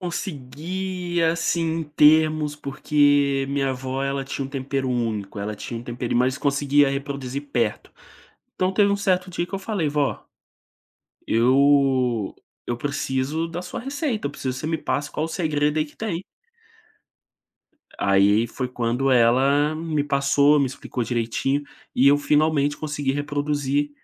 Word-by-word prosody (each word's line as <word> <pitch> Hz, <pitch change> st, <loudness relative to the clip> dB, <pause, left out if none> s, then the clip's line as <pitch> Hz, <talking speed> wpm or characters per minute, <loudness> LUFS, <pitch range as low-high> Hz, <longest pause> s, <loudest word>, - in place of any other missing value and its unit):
Consegui, 175 Hz, +2 st, -4 dB
assim, 170 Hz, +1 st, +1 dB, 0.2 s
em -, -, -2 dB
termos, 155 Hz, 0 st, +3 dB
porque 145 Hz, -1 st, +2 dB
minha 140 Hz, -1 st, 0 dB
vó, 130 Hz, +1 st, -4 dB
ela 140 Hz, 0 st, -2 dB
tinha 135 Hz, 0 st, -4 dB
um -, -, -11 dB
tempero 135 Hz, -1 st, -3 dB
único, 110 Hz, -5 st, -2 dB
ela 105 Hz, +1 st, -4 dB
tinha 115 Hz, +1 st, -6 dB
um -, -, -10 dB
tempero 120 Hz, 0 st, -4 dB
mas 130 Hz, +2 st, +2 dB
conseguia 145 Hz, 0 st, +3 dB
reproduzir 140 Hz, -1 st, -4 dB
perto. 115 Hz, -5 st, -1 dB, 0.6 s
Então 185 Hz, +1 st, 0 dB
teve 200 Hz, 0 st, +3 dB
um -, -, +1 dB
certo 185 Hz, -2 st, 0 dB
dia 170 Hz, -, -2 dB
que 180 Hz, -, -15 dB
eu 195 Hz, -, -1 dB
falei: 195 Hz, -6 st, -2 dB
"Vó" 145 Hz, -1 st, -1 dB, 1.1 s
"eu 130 Hz, -2 st, +3 dB, 0.3 s
eu 120 Hz, -, -1 dB
preciso 145 Hz, +3 st, -2 dB
da 170 Hz, +1 st, -5 dB
sua 180 Hz, -, -6 dB
receita, 270 Hz, -, -2 dB
eu -, -, -3 dB
preciso 130 Hz, -3 st, -4 dB
que 130 Hz, -, -6 dB
você 155 Hz, -, -4 dB
me 160 Hz, 0 st, -1 dB
passe 145 Hz, 0 st, -2 dB
qual 155 Hz, -, -2 dB
o -, -, -8 dB
segredo 155 Hz, -3 st, 0 dB
aí 155 Hz, -, +2 dB
que 145 Hz, -, -16 dB
tem". 195 Hz, -6 st, -3 dB, 1.8 s
Aí, 100 Hz, +3 st, +3 dB
foi 125 Hz, +2 st, -4 dB
quando 125 Hz, +2 st, 0 dB
ela 135 Hz, +5 st, +4 dB
me 155 Hz, -2 st, -2 dB
passou, 140 Hz, +1 st, +3 dB
me 140 Hz, -, +2 dB
explicou 130 Hz, -1 st, -5 dB
direitinho, 120 Hz, +5 st, -1 dB, 0.3 s
e 130 Hz, -, +4 dB
eu 145 Hz, +1 st, +5 dB
finalmente 145 Hz, 0 st, +2 dB
consegui 145 Hz, -3 st, -2 dB
reproduzir 145 Hz, 0 st, -1 dB
145 Hz, 150 wpm, -23 LUFS, 130-155 Hz, 1.8 s, eu